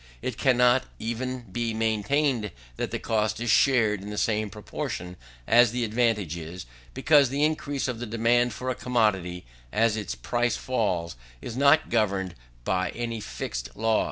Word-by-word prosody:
It 130 Hz, -, -2 dB
cannot 125 Hz, 0 st, +3 dB
even 125 Hz, +3 st, -3 dB
be 115 Hz, +1 st, -3 dB
maintained 110 Hz, +2 st, +1 dB, 0.3 s
that -, -, -3 dB
the -, -, -2 dB
cost 110 Hz, -1 st, -1 dB
is 120 Hz, -1 st, 0 dB
shared 110 Hz, -4 st, +3 dB
in 100 Hz, -, -7 dB
the 105 Hz, -, -6 dB
same 110 Hz, -1 st, 0 dB
proportion 90 Hz, -3 st, -5 dB, 0.3 s
as 120 Hz, 0 st, +5 dB
the 120 Hz, 0 st, -1 dB
advantage 110 Hz, -6 st, 0 dB
is; 85 Hz, +2 st, -7 dB, 0.3 s
because 145 Hz, -4 st, +4 dB
the 140 Hz, +3 st, 0 dB
increase 145 Hz, -3 st, -1 dB
of 125 Hz, -3 st, -3 dB
the 120 Hz, -, -5 dB
demand 115 Hz, +2 st, +2 dB
for 130 Hz, +4 st, -3 dB
a -, -, -3 dB
commodity 100 Hz, -9 st, 0 dB, 0.3 s
as 110 Hz, 0 st, +2 dB
its 105 Hz, -3 st, -4 dB
price 120 Hz, -, -1 dB
falls, 95 Hz, -, -1 dB, 0.2 s
is 115 Hz, -, -7 dB
not 140 Hz, +4 st, +4 dB
governed 100 Hz, -5 st, +1 dB, 0.3 s
by 95 Hz, 0 st, 0 dB
any 115 Hz, -1 st, -3 dB
fixed 65 Hz, -, -5 dB
law. 110 Hz, 0 st, +2 dB
115 Hz, 160 wpm, -26 LUFS, 105-125 Hz, 0.3 s, as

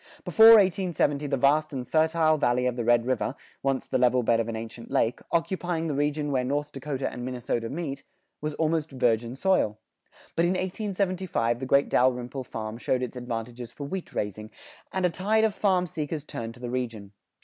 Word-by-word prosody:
Before 220 Hz, 0 st, +7 dB
1870 175 Hz, -7 st, +1 dB
the 140 Hz, -1 st, 0 dB
vast 145 Hz, +4 st, +3 dB
and 130 Hz, -3 st, -5 dB
fertile 160 Hz, +2 st, +3 dB
valley 125 Hz, -4 st, +1 dB
of 125 Hz, -1 st, 0 dB
the 120 Hz, -, -2 dB
Red 120 Hz, 0 st, +3 dB
River, 130 Hz, +1 st, -1 dB, 0.3 s
once 135 Hz, -1 st, 0 dB
the -, -, -1 dB
level 125 Hz, 0 st, +3 dB
bed 115 Hz, 0 st, +3 dB
of 115 Hz, 0 st, -1 dB
an 115 Hz, -, -3 dB
ancient 115 Hz, +1 st, -7 dB
lake, 115 Hz, +2 st, +1 dB
occupying 170 Hz, 0 st, -1 dB
the 155 Hz, -, -1 dB
region 145 Hz, +1 st, 0 dB
where 130 Hz, -2 st, +1 dB
North 145 Hz, +3 st, -2 dB
Dakota 135 Hz, 0 st, -3 dB
and 125 Hz, -, -6 dB
Minnesota 120 Hz, -2 st, -3 dB
meet, 140 Hz, -3 st, -4 dB, 0.4 s
was 150 Hz, 0 st, -3 dB
almost 160 Hz, -1 st, 0 dB
virgin 120 Hz, -2 st, 0 dB
soil. 135 Hz, -, +1 dB, 0.6 s
But 165 Hz, -, +3 dB
in 175 Hz, -, +2 dB
1875 185 Hz, -, -1 dB
the 130 Hz, -, -4 dB
great 140 Hz, +2 st, +4 dB
Dalrymple 125 Hz, +1 st, +1 dB
farm 110 Hz, -1 st, -6 dB
showed 130 Hz, 0 st, 0 dB
its 125 Hz, -, -5 dB
advantages 120 Hz, -1 st, -5 dB
for 130 Hz, +5 st, -8 dB
wheat 185 Hz, +5 st, -5 dB
raising, 105 Hz, +1 st, -4 dB, 0.4 s
and 190 Hz, -1 st, 0 dB
a 180 Hz, -, +2 dB
tide 215 Hz, +5 st, +1 dB
of 220 Hz, -2 st, +2 dB
farm 185 Hz, -3 st, +2 dB
seekers 155 Hz, -2 st, -4 dB
turned 115 Hz, -4 st, -6 dB
to -, -, -15 dB
the 120 Hz, -1 st, -5 dB
region. 115 Hz, -6 st, -4 dB
135 Hz, 190 wpm, -27 LUFS, 120-165 Hz, 0.6 s, Before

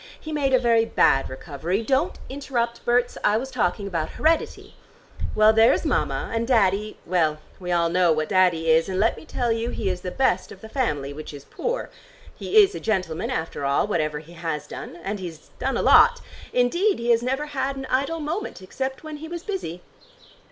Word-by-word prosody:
He 315 Hz, -, -8 dB
made 285 Hz, -3 st, 0 dB
a 260 Hz, -, +6 dB
very 235 Hz, -2 st, +3 dB
bad 135 Hz, -10 st, +3 dB
recovery. 160 Hz, +9 st, -3 dB
Don't 275 Hz, +9 st, +1 dB
interrupt, 245 Hz, -4 st, -3 dB
Berts: 245 Hz, 0 st, +1 dB
I 210 Hz, -, +3 dB
was 265 Hz, +3 st, -4 dB
talking 200 Hz, -5 st, 0 dB
about 165 Hz, -5 st, -2 dB
heredity. 320 Hz, +1 st, 0 dB, 0.6 s
Well, 215 Hz, +1 st, +6 dB
there's 225 Hz, +1 st, +4 dB
Mama, -, -, -1 dB
and 230 Hz, 0 st, -1 dB
Daddy, 210 Hz, -3 st, +2 dB
well, 165 Hz, -4 st, +1 dB, 0.2 s
we 180 Hz, -1 st, -4 dB
all 170 Hz, -1 st, +3 dB
know 175 Hz, 0 st, +3 dB
what 155 Hz, 0 st, 0 dB
Daddy 170 Hz, -3 st, +3 dB
is, 160 Hz, +3 st, +3 dB
and 185 Hz, 0 st, -2 dB
let 225 Hz, +3 st, +3 dB
me -, -, -12 dB
tell 245 Hz, -6 st, -1 dB
you 230 Hz, +1 st, -1 dB
he 205 Hz, -5 st, -2 dB
is 180 Hz, -1 st, -5 dB
the 180 Hz, -, -4 dB
best 260 Hz, +8 st, 0 dB
of -, -, -12 dB
the 220 Hz, -, -10 dB
family, 145 Hz, -, -1 dB
which 155 Hz, 0 st, -8 dB
is 140 Hz, -, -11 dB
poor. -, -, -3 dB, 0.4 s
He 435 Hz, -, -1 dB
is 400 Hz, 0 st, 0 dB
a -, -, -5 dB
gentleman 185 Hz, -6 st, -1 dB
after 160 Hz, -3 st, -3 dB
all, 140 Hz, 0 st, +2 dB
whatever 155 Hz, -7 st, -1 dB
he 160 Hz, +3 st, -11 dB
has 160 Hz, -3 st, -4 dB
done. 150 Hz, -, -8 dB
And 200 Hz, +1 st, -3 dB
he's 165 Hz, -4 st, -9 dB
done 265 Hz, +2 st, -1 dB
a -, -, -1 dB
lot. 480 Hz, 0 st, +6 dB, 0.3 s
Indeed 345 Hz, -, +2 dB
he 235 Hz, +1 st, 0 dB
has 230 Hz, 0 st, +4 dB
never 265 Hz, +4 st, -1 dB
had 275 Hz, -2 st, -2 dB
an 270 Hz, -1 st, -6 dB
idle 275 Hz, +6 st, 0 dB
moment, 320 Hz, +7 st, -4 dB
except 265 Hz, +9 st, -5 dB
when 310 Hz, -1 st, -7 dB
he 315 Hz, +2 st, -8 dB
was 340 Hz, +1 st, -6 dB
busy!" 180 Hz, -, -5 dB
220 Hz, 200 wpm, -24 LUFS, 170-265 Hz, 0.6 s, a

